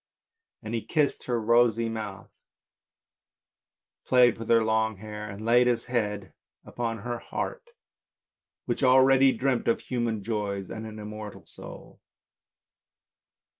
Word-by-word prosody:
And 110 +1 -6
he 115 - -1
kissed 150 -4 0
her 120 -2 0
rosy 115 0 +3
mouth, 105 -3 -6 1.7
played 125 -3 +4
with 115 - -6
her 115 -1 +5
long 110 -1 +1
hair, 105 +1 -7
and 100 +2 -8
laid 120 +2 +5
his 120 -1 0
head 105 -5 -2 0.3
upon 115 -1 -3
her 120 +3 -5
heart, 475 - -5 1.0
which - - -2
already 130 +1 +6
dreamt 125 0 -1
of 115 - +2
human 115 -4 -2
joys 100 -3 -3
and 110 0 -6
an 110 0 -9
immortal 105 0 -8
soul. - - -12
115 Hz, 125 wpm, -27 LUFS, 105-120 Hz, 1.7 s, already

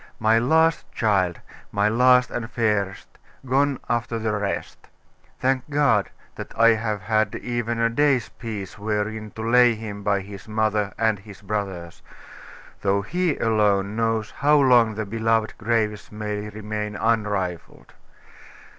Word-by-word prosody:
My 110 +1 +3
last 160 +6 +2
child 95 -6 0 0.3
my 100 0 +2
last 125 +2 +4
and 115 -1 -4
fairest 105 -4 -1 0.4
gone 135 +1 +1
after 120 0 -1
the 110 -1 -1
rest! 100 -1 -4 0.5
Thank 130 +1 0
God, 140 -8 +2 0.2
that - - -9
I 115 0 +7
have 110 -2 0
had 110 +2 0
even 120 -1 -3
a 115 - +3
day's 130 0 +2
peace 105 -4 -7
wherein 105 +1 -2
to 110 - -5
lay 120 0 +5
him 105 -2 -7
by 100 -1 +1
his 100 +1 -11
mother 110 -2 0
and 110 -3 +1
his 100 0 -14
brothers; 95 -5 -4 0.8
though 100 0 +1
He 175 - -1
alone 105 -2 +1
knows 115 -1 -1
how 150 +2 +3
long 120 -5 +4
the 110 0 -3
beloved 110 +1 0
graves 110 -2 -1
may 105 0 -4
remain 105 0 -5
unrifled. 105 -6 -2
110 Hz, 135 wpm, -23 LUFS, 105-115 Hz, 0.8 s, I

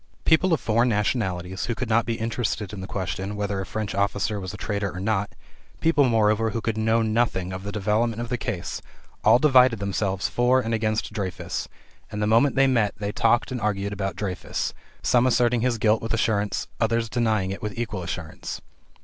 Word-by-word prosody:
People 175 +3 +4
of 160 - +3
foreign 115 +3 +2
nationalities, 95 -4 -1
who 115 - -2
could 130 - -3
not 115 +1 +2
be 115 - 0
interested 115 -3 -2
in 100 - -6
the 95 - -6
question 95 +1 -3
whether 100 -1 -2
a 95 - -6
French 110 -2 -3
officer 100 +1 0
was 95 -1 -5
a 105 - -8
traitor 100 -1 -2
or 95 - -7
not 100 0 0 0.5
people, 160 -3 +3
moreover, 110 0 +3
who 115 - -2
could 115 0 -2
know 110 +1 +2
nothing 110 -5 0
of 95 - -5
the 100 +1 -5
development 110 +3 0
of 120 0 -4
the 125 - 0
case 110 -7 -4 0.4
all - - +7
divided 130 -4 +5
themselves 100 -1 -1
for 125 +2 +3
and 115 -2 -2
against 110 -1 -1
Dreyfus, 95 -4 -3 0.4
and 105 - -4
the 105 - +1
moment 115 +6 +4
they 135 0 +5
met 115 -6 +2
they 100 0 -3
talked 115 +3 +2
and 125 -2 -3
argued 100 -1 -1
about 95 -2 -3
Dreyfus, 95 -2 -3 0.3
some 125 +1 +4
asserting 120 -1 +3
his 125 -1 +1
guilt 110 0 +2
with 115 0 -1
assurance, 105 -2 0
others 115 0 +1
denying 110 -5 0
it 100 - -6
with 105 0 -5
equal 110 -5 -3
assurance. 85 -2 -5
110 Hz, 200 wpm, -25 LUFS, 100-115 Hz, 0.5 s, all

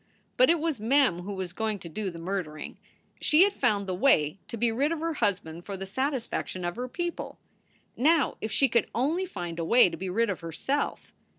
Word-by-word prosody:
But 255 - +5
it 335 0 +4
was 315 -5 -1
Mem 245 -4 +3
who 200 +3 -5
was 185 -2 -5
going 220 +1 -1
to 180 - -10
do 195 +5 -3
the 170 - -9
murdering. 165 -3 -5 0.4
She 310 +4 +5
had 400 0 +2
found 210 - +1
the 185 - -3
way 180 - +3
to 230 - -6
be 230 +1 +2
rid 275 +7 +1
of 335 - -2
her 330 +1 -1
husband 185 - -1
for 200 0 -6
the 195 - -5
satisfac 260 +4 -2
tion 185 -1 -5
of 175 - -2
her 250 +1 -4
people. 345 +6 -4 0.6
Now 310 +2 +3
if 220 - -3
she 275 - +4
could 235 -3 +1
only 315 +10 0
find 175 - -6
a - - -1
way 235 +4 +6
to - - -6
be 190 - -4
rid 225 +3 +1
of 190 - -5
herself. 175 - -3
220 Hz, 220 wpm, -28 LUFS, 185-275 Hz, 0.6 s, way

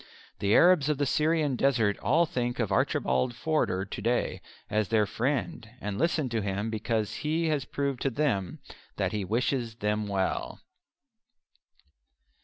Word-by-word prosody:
The 100 +1 +2
Arabs 175 -5 +5
of 150 - +1
the 145 - +1
Syrian 155 -1 +1
Desert 120 -6 +2
all 165 +7 +3
think 120 -4 -2
of 115 -5 -1
Archibald 65 - +1
Forder 125 - 0
to 100 - -7
day 120 +3 0 0.3
as 105 -1 0
their 110 -2 +3
friend 120 0 -2
and 100 -1 -4
listen 160 -2 +1
to 115 -2 -1
him 100 +2 -2
because 110 -1 -1
he 160 +2 0
has 145 -4 0
proved 140 -2 -2
to 135 - +1
them 115 - -1 0.4
that - - 0
he 105 -2 -2
wishes 115 +3 -1
them 105 -1 -1
well. 95 -2 -2
120 Hz, 150 wpm, -28 LUFS, 105-145 Hz, 0.4 s, Arabs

